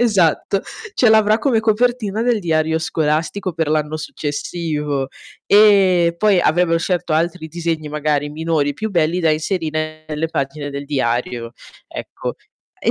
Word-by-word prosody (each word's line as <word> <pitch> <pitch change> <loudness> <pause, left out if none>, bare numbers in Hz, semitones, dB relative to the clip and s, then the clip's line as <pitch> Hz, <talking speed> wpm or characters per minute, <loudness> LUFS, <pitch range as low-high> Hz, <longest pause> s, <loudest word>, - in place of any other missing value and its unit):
esatto, 195 -4 +2 0.3
ce 245 - +4
l'avrà 215 -1 +5
come 240 -5 +2
copertina 220 -1 +1
del 240 -2 +1
diario 160 -2 +1
scolastico 160 +4 -1
per 160 -2 -1
l'anno 155 0 0
successivo. 150 -2 -3 0.4
E 190 -5 +5
poi 200 -1 +3
avevan 165 0 +2
scelto 175 -1 -1
altri 165 +1 0
disegni, 165 -1 -3
magari 150 -1 -1
minori, 155 -2 0
più 220 +10 -4
belli, 175 -2 +1
da 165 - +2
inserire 155 -1 -2
nelle 155 +1 -2
pagine 145 -1 -3
del 140 0 -6
diario, 120 -3 -2 0.3
ecco. - - -6 0.5
E - - +2
160 Hz, 135 wpm, -19 LUFS, 150-190 Hz, 0.5 s, l'avrà